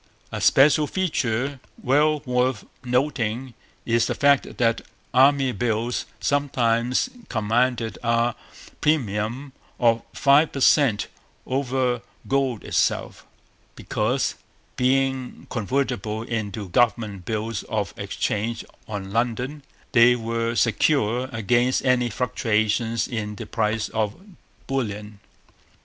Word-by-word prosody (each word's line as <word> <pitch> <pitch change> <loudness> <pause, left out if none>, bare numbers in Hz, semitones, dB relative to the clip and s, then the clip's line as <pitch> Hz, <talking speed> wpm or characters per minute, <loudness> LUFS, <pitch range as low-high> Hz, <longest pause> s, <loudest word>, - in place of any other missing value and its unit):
A - - -4
special 150 +2 +5
feature 140 -7 -1 0.2
well 150 +3 +2
worth 125 -3 0 0.2
noting 125 -1 -1 0.3
is 115 -1 +2
the - - -2
fact 140 -1 +2
that 115 -1 +2 0.3
Army 135 +1 +5
Bills 120 +1 -1
sometimes 125 - +1 0.2
commanded 115 +1 0
a 115 0 +1 0.5
premium 130 -1 0 0.3
of 115 -1 +3
five 140 +3 +4
per 135 - -3
cent 135 -6 +4 0.4
over 130 -2 0 0.3
gold 135 -5 0
itself, - - -1 0.5
because, - - -1 0.4
being 130 0 0
convertible 115 -2 -1
into 105 -4 -4
government 105 -3 +1
bills 110 -1 -2
of 105 -4 -2
exchange 115 +2 -2 0.2
on 100 -3 -5
London, 125 +5 -1 0.3
they 120 +1 +6
were 115 0 -2
secure 120 +1 +2
against 120 +3 +1
any 125 -2 +3
fluctuations 110 -1 0
in 105 -3 -4
the 115 - -7
price 105 +1 -1
of 110 -2 -1 0.5
bullion. 105 -6 -4
120 Hz, 100 wpm, -24 LUFS, 110-130 Hz, 0.5 s, they